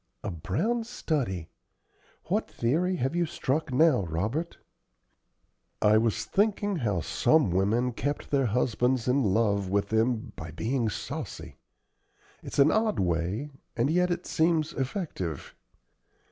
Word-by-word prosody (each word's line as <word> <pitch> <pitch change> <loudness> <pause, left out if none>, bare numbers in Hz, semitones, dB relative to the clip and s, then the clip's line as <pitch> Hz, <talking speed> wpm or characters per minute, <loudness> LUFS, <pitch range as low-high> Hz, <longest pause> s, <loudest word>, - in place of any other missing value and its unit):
"A 105 - -3
brown 125 - -1
study! 135 - -2 0.7
What - - -1
theory 170 +10 0
have 135 0 -1
you 175 -1 +1
struck 155 +1 -2
now, 140 -2 +4
Robert?" 105 - -2 1.2
"I 105 +1 +5
was 115 -1 0
thinking 205 -1 +1
how 105 - 0
some 125 - +2
women 110 +7 +1
kept 145 +5 -3
their 135 -3 +3
husbands 125 +2 +1
in 130 +3 +3
love 100 -2 +1
with 100 +1 0
them 115 +1 0
by 80 - -7
being 115 - -1
saucy. 100 - -6 0.8
It's - - -7
an 140 +2 +6
odd 220 -1 +1
way, 90 - -1 0.3
and 125 +5 +2
yet 180 +2 +2
it 175 - -2
seems 160 -1 +1
effective." 130 - -4
125 Hz, 130 wpm, -28 LUFS, 100-160 Hz, 1.2 s, an